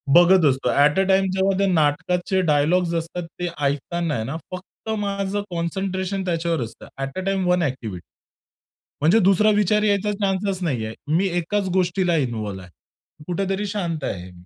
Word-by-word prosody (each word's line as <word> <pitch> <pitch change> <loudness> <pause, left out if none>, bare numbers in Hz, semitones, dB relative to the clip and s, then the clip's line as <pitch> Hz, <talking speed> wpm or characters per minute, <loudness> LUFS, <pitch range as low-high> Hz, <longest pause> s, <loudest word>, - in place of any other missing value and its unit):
बघत 175 -1 +6
असतो. 130 0 0 0.2
At 150 +6 +2
a, - - +4
time 190 0 +3
जेव्हा 190 0 +1
त्या 200 - +3
नाटकाचे 175 +5 +1
डायलॉग्स 170 +4 +2
असतात 165 +1 -4
ते 175 - -1 0.2
ऐकताना 155 +3 -1
आहे 110 - -2
ना, 145 +6 -4
फक्त 185 +4 -9
माझं 200 0 -2
कॉन्सन्ट्रेशन 190 +2 -2
त्याच्यावर 165 -4 -1
असतं. 115 - -10 0.2
At 135 +6 -5
a, - - -2
time 195 -2 0
one 180 0 +3
activity. 115 - -4 1.0
म्हणजे 175 +9 +5
दुसरा 195 +2 +4
विचार 210 +1 +2
यायचा 205 0 +1
चान्सच 195 -1 -1
नाही 125 -9 -1
आहे. 110 - -6 0.2
मी 195 +3 +2
एकाच 195 +3 -1
गोष्टीला 180 -1 +1
इन्व्हॉल्व्ह 110 -8 -3
आहे. 90 - -15 0.6
कुठेतरी 195 +3 -1
शांत 170 -7 -3
आहे. 90 0 -5
180 Hz, 160 wpm, -22 LUFS, 150-195 Hz, 1.0 s, बघत